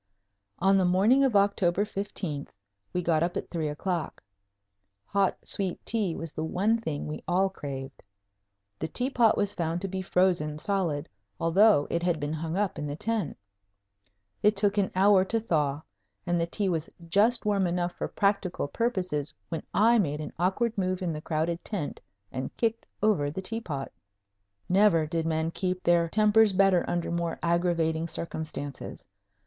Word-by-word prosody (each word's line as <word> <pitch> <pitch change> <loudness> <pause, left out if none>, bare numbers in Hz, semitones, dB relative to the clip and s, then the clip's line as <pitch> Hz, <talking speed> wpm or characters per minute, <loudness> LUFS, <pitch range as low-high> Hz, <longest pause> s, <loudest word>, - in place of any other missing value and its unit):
On 195 +3 +4
the - - +3
morning 200 +10 +4
of 260 -5 +2
October 200 -1 +3
15th 190 -8 -4 0.4
we 180 - -1
got 165 -2 +2
up 175 +1 0
at - - -5
three 160 -3 -1
o'clock. 165 +3 -3 0.8
Hot 200 -1 +1
sweet 190 -3 -3
tea 205 -7 0
was 165 -2 -5
the 155 - -3
one 195 +7 +1
thing 160 -11 -3
we 150 - -5
all 190 +2 +2
craved. 135 -6 -7 0.8
The 160 - -2
tea 250 - -1
pot 235 -4 +4
was 205 0 +1
found 170 -1 -1
to 195 - -2
be 190 0 -3
frozen 180 -5 +1
solid, 165 -5 -1 0.3
although 180 -1 +5
it 170 - 0
had 175 -2 +1
been 145 +1 -2
hung 160 +2 -3
up 205 -3 -1
in 150 - -3
the 145 - -4
tent. 210 -3 -2 1.0
It 210 +1 +4
took 205 0 +2
an 195 - +1
hour 195 0 +5
to 225 +4 0
thaw 150 -8 0 0.4
and 175 -1 +1
the 170 - 0
tea 200 +3 -1
was 165 -3 -1 0.2
just 220 +7 +3
warm 200 -3 +2
enough 175 0 -1
for - - -4
practical 200 -6 0
purposes 180 - -1 0.2
when 165 - -3
I 230 +3 +4
made 150 -6 0
an 155 - -6
awkward 205 +6 +1
move 185 0 -1
in 170 -3 -1
the 150 - -5
crowded 165 +2 -2
tent 185 -9 -4 0.3
and 130 0 -5
kicked 230 -1 -1 0.2
over 190 -10 +3
the 155 - -5
tea 225 +4 -3
pot! 140 -9 -5 0.8
Never 185 -4 +4
did 165 +1 -2
men 160 0 0
keep 180 +1 -2
their 170 -1 +3
tempers 215 +1 +4
better 190 -2 +4
under 175 -1 -1
more 170 -1 -2
aggravating 170 -1 +1
circumstances. 155 -4 -5
180 Hz, 170 wpm, -28 LUFS, 160-200 Hz, 1.0 s, although